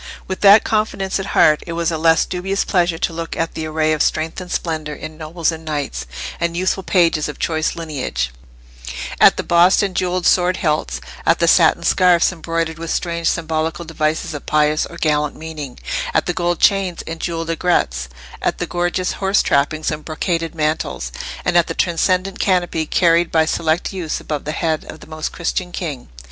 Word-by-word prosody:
With 190 - -4
that 205 +1 +8
confidence 205 -3 -1
at 195 - -4
heart 150 0 +5
it 170 - -4
was 170 0 0
a 160 - -1
less 165 0 +4
dubious 195 +2 -2
pleasure 175 -3 +1
to 165 - -1
look 165 0 -5
at 165 0 -1
the 160 -1 -4
array 155 0 +1
of 155 - -1
strength 160 +3 0
and 180 0 -9
splendour 155 -3 -2
in 155 +2 -8
nobles 165 +2 -1
and 160 0 -8
knights, 145 - -4 0.3
and 170 0 -1
youthful 185 +1 0
pages 170 -5 +2
of 150 - -7
choice 160 -1 -1
lineage—at - - -1
the - - -2
bossed 175 +4 +4
and 195 -2 -2
jewelled 180 -1 0
sword 180 0 +3
hilts, 150 - -1 0.2
at - - +3
the - - +2
satin - - +5
scarfs 180 -2 +4
embroidered 165 -2 -3
with 165 0 -5
strange 170 -1 0
symbolical 160 +1 -2
devices 155 0 -1
of 145 - -8
pious 150 0 +2
or - - -11
gallant 150 -1 0
meaning, 155 -5 -7 0.4
at - - +3
the 175 - -1
gold 175 -1 -1
chains 195 -3 +2
and 165 0 -6
jewelled 165 0 -3
aigrettes, 70 - 0 0.3
at - - 0
the - - -2
gorgeous 175 +1 -1
horse 195 +1 +1
trappings 155 +3 +1
and 150 0 -5
brocaded 165 +1 -2
mantles, 110 - -2 0.3
and 180 - +1
at 170 -1 +4
the - - -4
transcendent 185 +2 0
canopy 175 -4 +1
carried 170 -1 +3
by 160 -1 +3
select 160 +3 0
youths 175 -5 -3
above 150 -2 -4
the 150 - -2
head 160 -1 -1
of 155 - -9
the - - -13
Most 155 0 -5
Christian 180 +1 -3
King. 150 -9 -5
165 Hz, 185 wpm, -19 LUFS, 155-175 Hz, 0.4 s, that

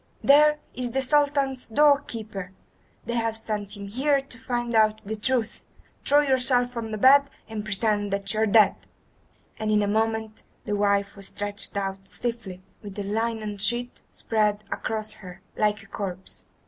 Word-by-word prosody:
"There 300 +2 +6 0.2
is 245 -2 -4
the 270 - +1
Sultan's 280 -2 +1
door 285 +4 +5
keeper! 210 -7 -7 0.5
They 235 - -3
have 225 -1 0
sent 210 -2 -4
him 200 0 -7
here 275 +7 +2
to 270 -2 -9
find 240 -2 -2
out 215 -1 +4
the 220 +2 -3
truth. 235 +1 -1 0.4
Quick! - - -13
throw 290 +1 +6
yourself 250 -2 +1
on 230 -1 -4
the 215 - -3
bed 275 +5 +6 0.2
and 220 -2 -5
pretend 205 -1 0
that 200 0 0
you 215 - -1
are 220 - +4
dead." 215 +1 +6 0.9
And 215 - -2
in 210 -1 +3
a - - 0
moment 220 +1 -1 0.2
the 210 - -1
wife 200 -1 +1
was 200 -1 -7
stretched 205 0 -4
out 195 -1 -3
stiffly, 205 -4 -5 0.2
with 205 -3 -9
a 205 - -2
linen 215 0 -2
sheet 240 +4 +1
spread 210 -2 0
across 215 -1 -2
her, 185 -4 -12
like 210 0 +1
a - - -16
corpse. 190 -3 -6
220 Hz, 175 wpm, -25 LUFS, 205-245 Hz, 0.9 s, There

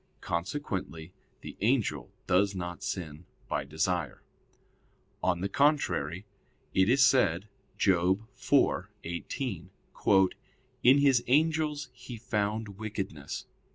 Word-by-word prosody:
Consequently 85 - -4 0.3
the - - -8
angel 100 - +1
does 95 +2 +2
not 90 -1 -5
sin 80 -2 -5 0.2
by - - -1
desire. 80 +5 -2 1.0
On 90 -1 +1
the 95 - 0
contrary, 100 - +1 0.5
It 95 +2 +3
is 135 +2 +5
said 100 -8 +3 0.3
(Job 95 +3 +2
4:18): 100 - 0 0.5
"In 130 +3 +7
His 135 -4 +4
angels 150 0 +2
He 125 -1 -9
found 105 -3 -2
wickedness." 95 -9 -5
100 Hz, 95 wpm, -29 LUFS, 90-125 Hz, 1.0 s, In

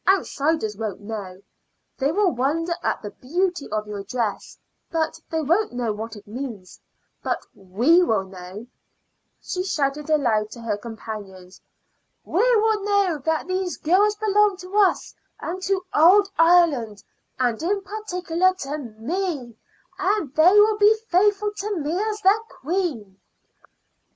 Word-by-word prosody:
"Outsiders 315 - +1
won't 215 -2 -4
know. 200 -3 -7 0.6
They 275 +2 +1
will 390 +1 +2
wonder 320 +7 0
at - - -2
the 205 - -6
beauty 350 - -2
of 215 0 -2
your 205 -1 -6
dress, 220 0 -3 0.3
but 320 -1 -1
they 320 -1 -1
won't 340 - +1
know 240 -3 -1
what 220 +2 -6
it 205 - -13
means; 220 -5 -7 0.4
but - - -2
we 230 - +3
will 220 - +1
know," 190 +3 -10 0.8
she 365 - -3
shouted 295 -4 -1
aloud 235 -9 +2
to 240 - -10
her 225 -3 -1
companions 205 -4 -9 0.6
"we - - 0
will 435 -1 +2
know 400 -6 +1
that 320 0 0
these 370 -1 -2
girls 400 +6 +3
belong 420 -2 +2
to 370 +1 -9
us 405 -3 +2 0.3
and 365 +2 -5
to 380 -1 -1
old 385 +6 +6
Ireland, 325 - +3 0.3
and 245 -3 0
in 395 +4 0
particular 370 -3 -1
to 295 -3 -5
me, 260 - -4 0.4
and 380 -8 0
they 315 +4 +6
will 420 +1 +5
be 425 +1 +6
faithful 410 +3 +3
to 410 0 -3
me 310 +1 -2
as 425 0 -2
their 395 +3 +5
queen." 270 - -3
320 Hz, 140 wpm, -23 LUFS, -, 0.8 s, old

